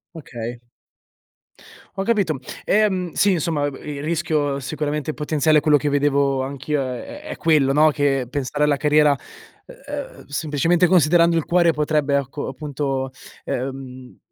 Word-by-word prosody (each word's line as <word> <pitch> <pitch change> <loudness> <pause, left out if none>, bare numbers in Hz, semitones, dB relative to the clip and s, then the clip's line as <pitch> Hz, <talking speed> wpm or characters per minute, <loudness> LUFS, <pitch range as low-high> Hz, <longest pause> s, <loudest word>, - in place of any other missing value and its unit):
Okay. 120 -6 -7 1.3
Ho 195 - -3
capito. 195 - 0 0.3
Ehm, 190 -5 +1
sì, 200 - +3
insomma, 155 -4 0
b 140 - -10
il 145 -1 -6
rischio 155 -3 0
sicuramente 150 +2 -3
potenziale 150 0 +2
è - - -7
quello 150 -1 +4
che 145 +1 -1
vedevo 140 -1 +1
anch'io 140 +2 -2
è 130 - -6
è 305 - -7
quello, 150 -4 +3
no, 155 +1 +5
che 140 -3 0
pensare 145 +1 -2
alla 145 -1 +2
carriera, 150 0 +4 0.5
ehm, - - -8
semplicemente, 165 +4 +1
considerando 170 0 +4
il 160 - -1
cuore 170 -1 +3
potrebbe, 150 -1 +1
ecco, 140 +1 -4
appunto, 135 -3 -3 0.3
ehm, 130 -1 -6
150 Hz, 140 wpm, -21 LUFS, 140-165 Hz, 1.3 s, no